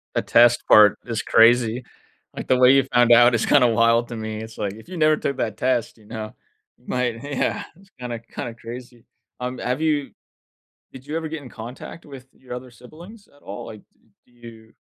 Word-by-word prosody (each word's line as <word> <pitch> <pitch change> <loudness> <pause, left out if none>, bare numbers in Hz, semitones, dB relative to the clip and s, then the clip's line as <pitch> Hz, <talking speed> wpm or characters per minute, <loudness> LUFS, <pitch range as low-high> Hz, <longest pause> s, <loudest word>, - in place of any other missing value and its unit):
The - - +1
test 120 0 +4
part 105 -2 +6
is 115 -3 -3
crazy, 120 +1 +3 0.5
like, - - -7
the 130 - +3
way 125 +1 +6
you 135 - +4
found 120 -1 +4
out 120 +1 +6
is 115 - 0
kinda 135 -4 +4
wild 115 +1 +2
to 120 - -6
me. 110 -1 -5
It's 110 0 -10
like, 100 -2 -3
if 110 - -15
you 185 - -7
never 155 -1 +3
took 140 -2 -3
that - - -3
test, 125 -4 -1
you 110 - -21
know, 110 0 -7 0.4
you 125 - -29
might 125 -2 -2
Yeah. 140 -2 -2
It's 195 +1 -21
kinda 120 -2 -5
kinda 115 +1 -8
crazy. 120 0 -11 0.4
Um, 125 +1 -4
have 125 +4 -2
you 150 -3 0 0.8
did 130 +1 -13
you 150 - -4
ever 160 -1 -5
get 160 -1 -6
in 135 - -11
contact 120 +8 -10
with 135 -3 -12
your 130 -1 -11
other 125 +1 -8
siblings 170 - -15
at 145 - -25
all? 100 - -8
Like, 110 -2 -10
d - - -39 0.2
do - - -30
you 115 -2 -15
120 Hz, 210 wpm, -22 LUFS, 115-135 Hz, 0.8 s, part